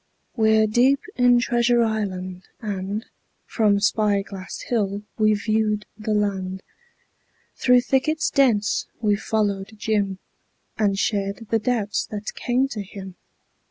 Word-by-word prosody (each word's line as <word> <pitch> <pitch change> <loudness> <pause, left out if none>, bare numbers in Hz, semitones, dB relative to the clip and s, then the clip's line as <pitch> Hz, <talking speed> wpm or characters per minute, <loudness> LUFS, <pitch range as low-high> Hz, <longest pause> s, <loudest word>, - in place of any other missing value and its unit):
We're 220 -1 +4
deep 250 +6 +3 0.2
in 245 -1 +5
Treasure 240 -1 +2
Island, 185 -4 -3
and 205 0 -4 0.4
From 210 -3 +2
Spy 205 -1 +2
Glass 195 -1 -8
Hill 205 -3 -1 0.2
we've 215 -1 +3
viewed 215 -1 +1
the 215 0 -2
land; 190 -2 -1 0.9
Through 250 -1 +4
thickets 310 +5 +1
dense 225 -7 +2
we've 210 -2 +1
followed 205 -1 -1
Jim 205 -3 0 0.6
And 200 -2 +1
shared 200 +2 -1
the 225 - +3
doubts 215 -2 -1
that 210 0 -5
came 250 +2 0
to 215 -6 -4
him. 195 -1 -9
215 Hz, 125 wpm, -23 LUFS, 200-230 Hz, 0.9 s, in